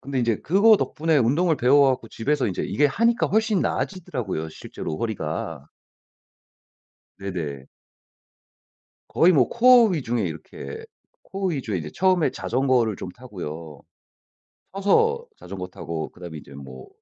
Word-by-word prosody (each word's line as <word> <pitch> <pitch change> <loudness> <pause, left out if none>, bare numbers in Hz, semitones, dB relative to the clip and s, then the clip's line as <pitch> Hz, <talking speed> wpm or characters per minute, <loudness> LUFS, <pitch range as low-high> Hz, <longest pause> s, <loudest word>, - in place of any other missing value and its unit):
근데 135 -1 -4
인제 115 -3 +1
그거 205 +7 +5
덕분에 160 -4 0
운동을 150 +7 +2
배워 140 +3 +5
갖고 125 -3 -3
집에서 140 +6 -1
인제 95 - -2
이게 145 - +2
하니까 230 - +2
훨씬 220 -2 +1
나아지더라고요, 120 - -3
실제로 75 - -7
허리가. 80 - -4 1.5
네네. 85 -9 -5 1.4
거의 175 - +4
뭐 130 -6 +4
코어 245 0 +6
위중의 120 - -1
이렇게 75 -3 -8 0.4
코어 195 0 -3
위주의 130 - -2
이제 80 - -6
처음에 185 -3 +2
자전거를 125 -4 +1
좀 90 - -7
타고요. 85 - -8 0.9
서서 455 - +2
자전거 90 -2 -7
타고 80 -3 -5
그다음에 85 -3 -9
이제 70 - -13
뭐 65 -2 -10
125 Hz, 305 characters per minute, -24 LUFS, -, 1.5 s, 코어